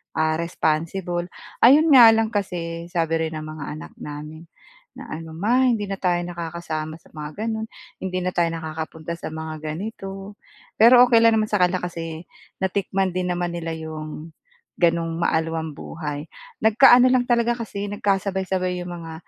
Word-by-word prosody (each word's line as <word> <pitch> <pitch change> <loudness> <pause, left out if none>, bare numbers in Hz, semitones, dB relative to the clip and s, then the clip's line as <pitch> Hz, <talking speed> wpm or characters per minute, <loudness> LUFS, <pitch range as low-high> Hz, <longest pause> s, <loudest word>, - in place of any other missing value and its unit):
ah, 155 0 +2
responsible. 175 +2 -1 0.3
Ayun 295 +6 +7
nga 235 -3 +10
lang 225 0 +1
kasi 170 -4 -3
sabi 165 -2 0
rin 160 - -7
ng 155 0 -5
mga 155 -2 -7
anak 155 - -10
namin 150 +3 -8 0.5
na - - -9
ano, 160 0 -7
"Ma 240 +9 +2
hindi 225 -4 +1
na 195 -1 -4
tayo 175 -2 +1
nakakasama 165 -2 -5
sa 165 - -19
mga 155 +7 -7
gano'n, 220 -1 -2 0.3
hindi 185 -1 -3
na 185 - -1
tayo 175 -1 +1
nakakapunta 160 +1 -6
sa - - -5
mga 160 -1 -6 0.2
ganito." 195 0 -7 0.4
Pero 245 +3 +8
okey 230 -2 +5
lang 230 0 +5
naman 215 -1 0
sa 210 - +2
kanila 180 0 +2
kasi 165 -2 -5 0.4
natikman 190 0 0
din 180 0 -2
naman 175 0 -2
nila 165 -1 -4
'yong 155 0 -7 0.5
gano'n 165 -1 +1
maalwan 160 -2 -1
buhay. 150 -2 -6 0.4
Nagkaano 245 +3 +7
lang 250 -1 +2
talaga 240 0 +3
kasi 220 -4 -5
nagkasabay-sabay 190 -2 -1
'yong 175 - -6
mga 165 -2 -7
175 Hz, 160 wpm, -23 LUFS, 160-205 Hz, 0.5 s, nga